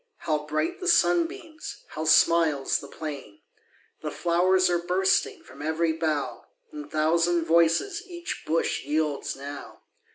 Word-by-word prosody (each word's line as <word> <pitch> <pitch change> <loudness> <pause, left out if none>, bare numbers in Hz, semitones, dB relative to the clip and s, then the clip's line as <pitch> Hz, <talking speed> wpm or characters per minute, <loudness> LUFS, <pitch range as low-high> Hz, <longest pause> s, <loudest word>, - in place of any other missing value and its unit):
How 150 -1 -1
bright 155 - -1
the 365 - -4
sunbeams! 340 -2 0
How 155 +1 -5
smiles 160 -3 +3
the - - -10
plain! 145 -10 -8 0.6
The - - -3
flow'rs 185 +2 +2
are 175 -1 +1
bursting 190 - +1
From - - -13
ev'ry 160 +2 0
bough, 155 -3 -2 0.3
And 300 -1 -8
thousand 165 +2 +2
voices 170 - +2
Each 345 -2 -6
bush 165 +1 0
yields 150 0 -1
now. 140 +1 -9
165 Hz, 130 wpm, -26 LUFS, 155-190 Hz, 0.6 s, smiles